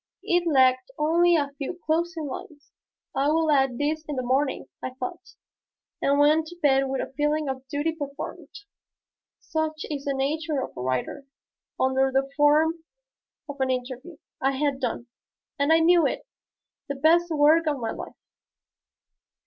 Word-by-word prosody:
It 350 0 +1
lacked 260 -4 +3
only 340 +3 +3
a 285 -3 0
few 295 +5 -4
closing 330 0 0
lines. 290 +2 -9 0.4
"I 275 - +1
will 320 0 +2
add 270 -4 +2
these 305 +3 -1
in 295 - -3
the 255 - -2
morning," 265 +3 0 0.2
I 255 - -5
thought, 345 +10 -7 0.7
and 280 +1 +2
went 305 +2 +4
to 350 +2 -11
bed 270 -3 +3
with 265 0 -1
a - - -7
feeling 295 +2 0
of 265 0 -5
duty 290 +4 -1
performed, 285 -3 -7 0.9
such 315 0 -3
is 280 -2 -4
the 280 -1 -1
nature 300 +2 -1
of - - -8
a - - -6
writer. 130 - -3 0.5
Under 265 +1 +2
the 270 +1 +1
form 310 +3 +3 0.6
of 285 -1 -7
an 265 - +1
interview 255 +5 -4 0.2
I 270 +1 +2
had 280 0 -1
done, 240 -2 -3 0.5
and 285 +2 +2
I 325 - +7
knew 335 +1 +5
it, - - -4 0.6
the 280 - -2
best 330 +5 +3
work 315 +1 +4
of 295 -2 +1
my 225 -3 -3
life. - - -8
290 Hz, 160 wpm, -25 LUFS, 270-320 Hz, 0.9 s, I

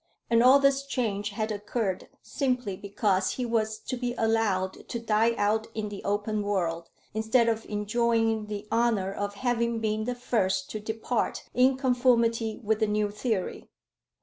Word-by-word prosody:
And 230 0 +5
all 255 +3 +8
this 275 0 +3
change 215 -7 -2
had 215 +1 -3
occurred 205 -2 -2 0.2
simply 250 -8 -1
because 200 -1 0
he 250 - -3
was 220 -2 0
to 255 - -4
be 245 0 -3
allowed 220 -4 0
to - - -2
die 225 +1 +2
out 215 +2 +1
in 215 -1 -3
the 205 -1 -8
open 205 +1 -1
world, 170 -5 -1 0.2
instead 220 +2 +2
of 225 -1 0
enjoying 225 +1 0
the 210 0 -6
honour 225 -5 +1
of 205 0 -3
having 235 0 0
been 215 0 -1
the 250 +1 -2
first 245 0 0
to 215 - -4
depart 220 +2 -2
in 255 +1 +4
conformity 235 -4 +2
with 220 0 +1
the 220 - +2
new 210 0 0
theory. 210 -2 -3
220 Hz, 160 wpm, -27 LUFS, 205-235 Hz, 0.2 s, all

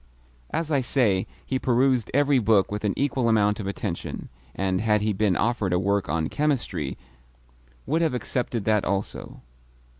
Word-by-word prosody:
As 160 -1 -2
I 140 -3 +3
say, 115 -7 +1 0.2
he 130 - -1
perused 125 -1 +2
every 140 -1 +3
book 105 -4 +3
with 105 0 -4
an 105 -2 0
equal 130 -4 +1
amount 105 -1 +3
of 100 - -4
attention, 100 -3 -4 0.3
and, 95 -1 0
had 105 -1 +2
he 105 0 +1
been 100 -1 +1
offered 110 -5 0
a - - +3
work 100 +1 0
on 80 -1 0
chemistry, 150 -3 -1 0.9
would 160 +6 +1
have 160 -6 +1
accepted 120 -3 -2
that 105 -2 +2
also. 100 +1 -3
110 Hz, 160 wpm, -25 LUFS, 100-130 Hz, 0.9 s, I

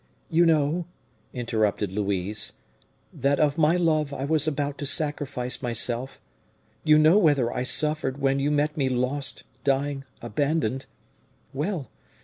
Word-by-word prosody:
'" - - -39
"You 170 +1 +4
know," 160 +2 +1 0.4
interrupted 110 -5 -1
Louise, 100 0 -1 0.6
"that 140 +1 0
of 150 +1 +2
my 155 +2 +4
love 155 -4 +1
I 135 -1 -4
was 155 0 +1
about 145 -1 -2
to 145 - -1
sacrifice 145 -4 -1
myself; 120 +1 -1 0.6
you 155 -1 +5
know 155 +6 +6
whether 140 - +2
I - - -2
suffered 145 0 +1
when 135 0 +1
you 140 +1 +1
met 150 +1 0
me 135 -4 0
lost, 130 +2 -1 0.2
dying, 140 0 0 0.2
abandoned. 135 +2 -1 0.7
Well! 150 +1 -3
140 Hz, 135 wpm, -25 LUFS, 125-155 Hz, 0.7 s, know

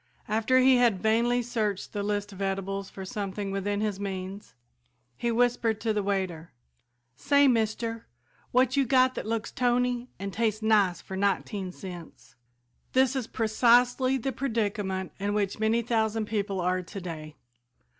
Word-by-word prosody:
After 225 +4 +2
he 260 0 +6
had 235 -6 +3
vainly 235 +3 +2
searched 220 -5 -2
the 205 - -2
list 205 0 -2
of 195 - -9
edibles 195 0 -2
for 190 - -8
something 200 0 -4
within 200 +1 -1
his 210 -3 -1
means, 195 0 -6 0.6
he 235 - -1
whispered 230 -2 +1
to 225 -2 0
the 210 - 0
waiter, 190 -5 -2 0.6
"Say, 285 - +4
Mister, 225 -1 0 0.4
what 255 +1 +3
you 280 - +4
got 255 0 +4
that - - -5
looks 225 -1 -2
tony 245 0 0
an' 195 0 -5
tastes 220 0 -1
nice 205 -5 +3
for 190 - -7
nineteen 195 0 -1
cents?" 165 -9 -10 0.6
This 260 +1 +3
is 255 -4 -2
precisely 245 +4 +3
the 265 +2 -2
predicament 205 -7 -2
in 205 +1 -1
which 205 0 -1
many 220 +2 +2
thousand 220 -1 0
people 205 -2 -2
are 180 +1 0
today. 165 -5 -7
215 Hz, 150 wpm, -28 LUFS, 195-240 Hz, 0.6 s, he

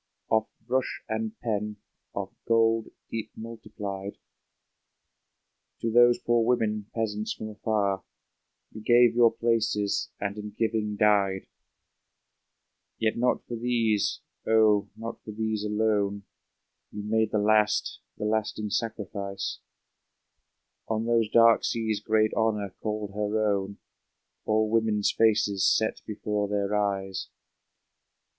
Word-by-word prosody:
Of 110 0 +3 0.2
brush 130 +2 -1
and 110 -1 -3
pen, 105 -2 -2 0.4
of - - -4
gold 115 -1 +3 0.2
deep 115 -1 -4
multiplied, 105 -3 -6 1.6
To 115 - 0
those 120 +1 +6
poor 120 -1 +2
women, 110 -3 0
peasants 110 -2 -2
from 110 - -6
afar. 105 -2 -1 0.7
You 110 - -9
gave 120 +1 +5
your 120 -1 +5
places, 110 -3 0
and 100 +1 -3
in 105 -1 -7
giving 110 -2 0
died! 100 -3 +2 1.5
Yet 110 -1 +1
not 125 +1 +1
for 120 - -5
these, 115 -3 0 0.3
oh, 110 -2 +4
not 115 +1 -7
for - - -11
these 110 0 -2
alone. 105 -1 0 0.7
You 105 - -6
made 110 +1 +1
the 105 - 0
last, 105 0 +2 0.2
the - - -3
lasting 105 -1 -1
sacrifice! 100 -3 -3 1.3
On 110 0 -1
those 115 -2 +2
dark 115 0 +6
seas 110 -2 -1
great 110 0 +2
Honor 105 -4 0
called 105 -1 -3
her 105 +1 0
own, 100 0 -3 0.7
All 110 0 +2
women's 110 -2 +2
faces 105 -3 +3
set 110 0 +2
before 105 -1 -2
their 100 0 -1
eyes! 95 -2 -1
110 Hz, 115 wpm, -27 LUFS, 105-115 Hz, 1.6 s, those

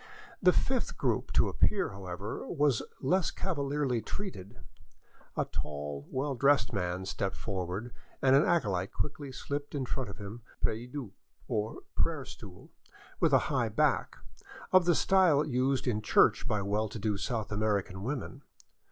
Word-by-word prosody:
The 180 - +7
fifth 260 +6 0
group - - 0
to - - +4
appear, 195 -3 +2
however, 95 +1 -6
was 145 -7 +2 0.2
less 180 +6 +2
cavalierly 140 -8 -1
treated. 120 - -6 0.8
A - - +2
tall, 75 -1 -5
well 135 +2 -1
dressed 140 +1 +3
man 90 -1 -1
stepped 95 +1 -2
forward, 95 +4 -4 0.3
and 135 0 +5
an 140 - +6
acolyte 100 - +1
quickly 145 -2 -4
slipped 145 +3 -4
in 135 -2 -1
front 130 -2 -3
of 100 - -9
him 105 +3 -8
a - - -25
prie 115 +3 0
dieu, 125 -5 -6 0.4
or 105 +1 -2
prayer 155 -5 0
stool 95 -6 -11 0.5
with - - +4
high - - +2
back, - - +1 0.5
of 185 -2 +6
the 175 -2 +4
style 175 -7 +4
used 130 -1 +1
in 110 -3 +1
church 110 - +4
by 100 -2 0
well 105 +2 0
to 110 - -6
do 105 0 0
South 110 +3 -2
American 100 -3 0
women. 135 +3 -4
120 Hz, 150 wpm, -31 LUFS, 100-145 Hz, 0.8 s, The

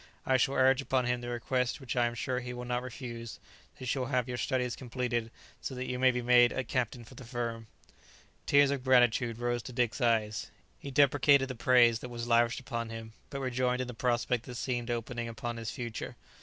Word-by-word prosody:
I 130 - +4
shall 135 +2 +1
urge 130 +1 +4
upon 130 -2 0
him 125 0 0
the 120 - -5
request 125 +1 -1
which 135 -2 -5
I 120 -1 +3
am 120 - -4
sure 125 +1 -2
he 125 0 -6
will 125 0 -6
not 125 0 -1
refuse, 120 -2 -7 0.4
that - - -20
you - - -5
shall 125 +1 -1
have 125 -2 0
your 125 - -3
studies 125 -2 0
completed, 120 -2 -2 0.3
so 130 - -5
that 125 0 -4
you 125 0 -3
may 130 0 +5
be 125 -1 -1
made 120 0 +6
a 130 - -2
captain 120 0 -2
for 120 - -14
the 130 - -11
firm." 115 -2 -4 0.8
Tears 140 0 +5
of 140 -3 -2
gratitude 120 -2 +3
rose 120 0 -1
to 125 - -9
Dick's 120 +1 0
eyes. 110 -4 +1 0.3
He 140 - -7
deprecated 140 0 +4
the - - -3
praise 120 -1 +4
that 125 - -7
was 120 -1 -5
lavished 115 -1 +3
upon 115 -3 -4
him, 115 -1 -8 0.2
but 140 -1 -5
rejoiced 125 -1 0
in - - -2
the 125 - -6
prospect 120 0 0
that 125 - -7
seemed 120 -1 -2
opening 120 0 -3
upon 115 +1 -5
his 115 -1 -4
future. 120 -1 -5
Mrs. - - -31
125 Hz, 225 wpm, -31 LUFS, 120-130 Hz, 0.8 s, made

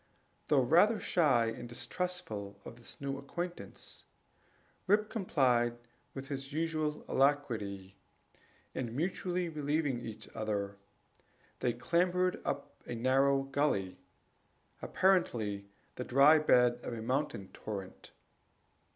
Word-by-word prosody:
Though 140 -3 +4
rather 180 - +5
shy 140 -9 +3
and 120 +1 -5
distrustful 120 - -4
of 115 - -9
this 120 - -11
new 140 -1 -3
acquaintance, 175 +5 -7 0.8
Rip 210 +2 +3
complied 125 - +2 0.4
with 135 0 -6
his 135 0 -5
usual 155 -1 -1
alacrity; 110 -9 0 0.8
and 120 -2 -4
mutually 180 +3 -1
relieving 145 -4 -1
one 110 -2 -6 0.2
another, 100 -2 -2 0.8
they 120 - +1
clambered 180 +7 +1
up 140 0 -4
a 120 - -4
narrow 135 +3 +3
gully, 135 -9 0 0.8
apparently 110 - +1 0.3
the 125 - -2
dry 140 +5 +6
bed 125 -5 +4
of 120 - -5
a 115 - -5
mountain 125 -6 -1
torrent. 100 -3 -7
135 Hz, 110 wpm, -33 LUFS, 115-160 Hz, 0.8 s, dry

